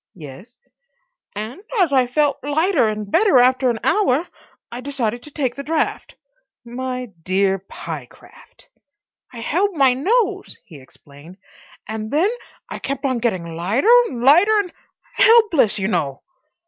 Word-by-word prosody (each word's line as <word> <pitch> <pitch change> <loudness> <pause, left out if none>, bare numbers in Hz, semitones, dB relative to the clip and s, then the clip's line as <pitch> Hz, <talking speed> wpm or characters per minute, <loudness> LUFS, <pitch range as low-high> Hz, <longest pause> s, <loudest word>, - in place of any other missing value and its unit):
"Yes?" 175 - -12 0.8
"And 220 - -6 0.2
as 350 -8 +2
I 255 -2 +3
felt 290 +3 0
lighter 305 - +1
and 210 -1 -4
better 410 -10 +4
after 255 +1 +3
an 235 - -1
hour, 315 - +1 0.4
I 240 +1 -7
decided 245 -4 -3
to 300 - -13
take 265 -5 -2
the 280 - -7
draught." 310 +2 -2 0.5
"My 250 +1 -5
dear 190 +2 0
Pyecraft!" 195 - -11 0.6
"I 235 - -9
held 370 - 0
my 270 -4 +4
nose," 390 - -1
he 155 -7 -13
explained. 145 +6 -16 0.5
"And 220 0 -5
then 335 - +1 0.4
I - - -7
kept 275 +1 -4
on 255 -3 0
getting 185 -8 -3
lighter 215 - +2
and 245 -4 -6
lighter—and 360 +7 +4 0.4
helpless, 435 - +4
you 190 -1 -1
know." 150 -9 -2
255 Hz, 135 wpm, -20 LUFS, 215-310 Hz, 0.8 s, better